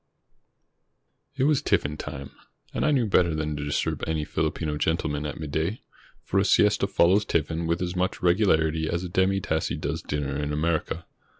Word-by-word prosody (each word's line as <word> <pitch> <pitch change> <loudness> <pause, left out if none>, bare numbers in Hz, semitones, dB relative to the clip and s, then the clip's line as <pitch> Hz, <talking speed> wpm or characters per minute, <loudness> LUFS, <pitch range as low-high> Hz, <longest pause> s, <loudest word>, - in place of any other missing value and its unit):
It 135 - 0
was 150 0 +3
tiffin 75 +1 +1
time, 70 -3 -7 0.4
and - - -1
I - - +3
knew 135 -5 +3
better 90 -5 +3
than 75 -1 -2
to 75 - -4
disturb 75 0 -1
any 80 -2 -1
Filipino 75 0 -2
gentleman 75 -1 -1
at 75 - -6
midday. 80 +7 -2 0.4
For 95 - +1
a - - +3
siesta 105 0 +3
follows 95 +1 +4
tiffin 80 -2 -1
with 85 +2 0
as 90 +1 -3
much 90 +1 -1
regularity 80 -4 +2
as 85 +1 -1
a 90 - -4
demi 95 +2 +2
tasse 80 -5 -1
does - - -3
dinner 70 -1 -3
in 75 0 -2
America. 80 +2 -1
80 Hz, 175 wpm, -26 LUFS, 75-95 Hz, 0.4 s, follows